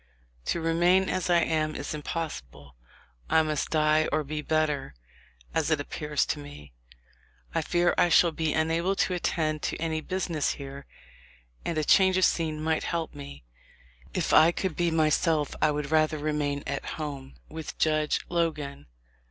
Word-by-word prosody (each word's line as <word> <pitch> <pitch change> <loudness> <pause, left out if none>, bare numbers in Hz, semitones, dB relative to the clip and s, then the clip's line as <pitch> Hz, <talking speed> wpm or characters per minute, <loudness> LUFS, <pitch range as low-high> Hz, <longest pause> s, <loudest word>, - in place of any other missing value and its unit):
To - - 0
remain 175 +3 +3
as 185 -1 -1
I 170 -1 +5
am 155 -1 0
is 140 - -4
impossible. 70 - -6 0.5
I 160 - +4
must 155 -2 -2
die 155 0 +3
or 155 0 +1
be 150 +1 -4
better, 150 - -1 0.6
as 160 -1 +1
it 155 -2 +2
appears 150 0 -1
to 150 - -2
me... 145 - -11 0.8
I - - +1
fear 175 0 +2
1 175 - +4
shall 170 0 +5
be 160 -1 -1
unable 165 +5 +1
to 185 - +1
attend 155 -3 -1
to - - -2
any 160 -1 -2
business 175 -4 -1
here, 140 0 -9 0.8
and 165 - -2
a 155 - +1
change 190 +4 +5
of 185 - +5
scene 155 -2 0
might 160 0 0
help 165 -2 -2
me. 140 - -10 0.7
If - - -1
I 160 +2 +7
could 185 -1 -3
be 175 -1 +1
myself 155 -1 +2
I 155 - +4
would 150 0 -3
rather 155 -1 +3
remain 145 -1 -1
at 140 0 -3
home 140 -3 -6
with 160 0 -7
Judge 155 -1 +1
Logan. 155 - -2
155 Hz, 160 wpm, -27 LUFS, 150-165 Hz, 0.8 s, I